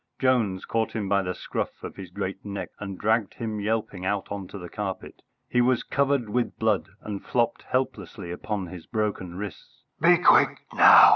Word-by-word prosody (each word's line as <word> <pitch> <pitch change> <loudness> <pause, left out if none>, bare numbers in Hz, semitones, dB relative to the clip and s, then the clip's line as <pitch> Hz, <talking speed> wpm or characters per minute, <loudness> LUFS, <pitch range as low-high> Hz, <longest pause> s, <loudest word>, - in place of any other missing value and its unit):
Jones 115 -8 +2
caught 115 -1 0
him 105 -3 -2
by 100 0 +3
the 90 -1 -3
scruff - - -4
of - - -6
his 95 -2 -8
great 95 +2 -4
neck 100 -1 -5
and 100 -2 -5
dragged 110 +1 +1
him 110 -2 -3
yelping 105 -3 -1
out 100 +1 -1
on 100 -2 -4
to 100 - -8
the 90 -2 -7
carpet. 100 0 -5 0.3
He 125 - +2
was 125 0 +3
covered 140 -4 +1
with 120 +3 -1
blood, 110 -2 +1
and 100 -2 -5
flopped 120 -2 +1
helplessly 115 -7 -3
upon 100 +2 -3
his 90 -1 -9
broken 105 -5 -2
wrists. 100 +1 -8 0.2
"Be - - +7
quick - - +5 0.2
now!" - - +9
105 Hz, 185 wpm, -26 LUFS, 95-115 Hz, 0.3 s, now